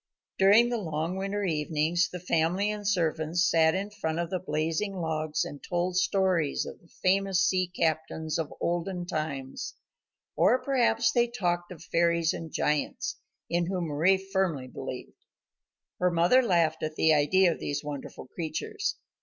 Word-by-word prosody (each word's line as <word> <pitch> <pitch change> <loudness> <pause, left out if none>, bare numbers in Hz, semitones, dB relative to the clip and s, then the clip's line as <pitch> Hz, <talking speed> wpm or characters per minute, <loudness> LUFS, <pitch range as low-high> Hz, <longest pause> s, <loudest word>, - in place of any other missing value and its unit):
During 205 +5 +6
the 240 -1 -1
long 165 -1 -2
winter 195 +2 -2
evenings 160 0 +1
the 180 - -6
family 180 +4 +1
and 210 -1 -5
servants 170 -3 +1
sat 160 -1 +4
in 200 +2 -3
front 160 -6 -3
of 170 -1 -2
the 185 - -1
blazing 165 +4 -2
logs 155 -3 -1
and 145 - -8
told 175 0 -2
stories 185 -6 +1
of - - -9
the 170 - -23 0.2
famous 195 0 +3
sea 185 -2 +2
captains 160 -2 -1
of 160 -2 -2
the - - -12
olden 175 +1 -2
times. 140 -5 -4 0.6
Or 240 +5 +4
perhaps 235 -4 +2
they 240 0 +3
talked 175 -7 -2
of 175 - -10
the - - -13
fairies 170 -1 +2
and 165 -1 -7
giants, 150 -1 -1 0.3
in 170 0 0
whom 180 -3 -2
Mari 165 +6 +3
firmly 190 -8 -1
believed. - - -8 0.8
Her 180 - +3
mother 175 +9 +4
laughed 170 -8 +2
at 155 0 -3
the 160 0 +4
idea 170 +5 +4
of - - -5
these 145 0 -3
wonderful 145 -3 -7
creatures. 180 - -3
175 Hz, 160 wpm, -28 LUFS, 160-190 Hz, 0.8 s, During